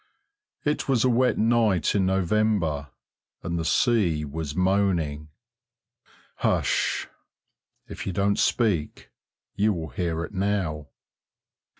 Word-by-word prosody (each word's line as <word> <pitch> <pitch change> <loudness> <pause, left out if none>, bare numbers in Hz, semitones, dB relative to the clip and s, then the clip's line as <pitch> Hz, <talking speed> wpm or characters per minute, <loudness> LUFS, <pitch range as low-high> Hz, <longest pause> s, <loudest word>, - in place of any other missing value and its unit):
It 150 -1 -1
was 125 -4 +3
a - - +4
wet 125 +1 +2
night 110 -7 +2
in 95 -2 +2
November, 95 -6 0 0.5
and 85 -1 -2
the - - -2
sea 85 - +2
was 75 0 -5
moaning. 90 -6 0 1.1
Hush! - - 0 0.8
if - - -7
you - - -1
don't 100 +2 +1
speak 100 -11 0 0.4
you 105 +1 +2
will 80 -3 -5
hear 80 +4 -2
it 95 - -8
now.... 95 -7 -1
95 Hz, 110 wpm, -25 LUFS, 80-105 Hz, 1.1 s, a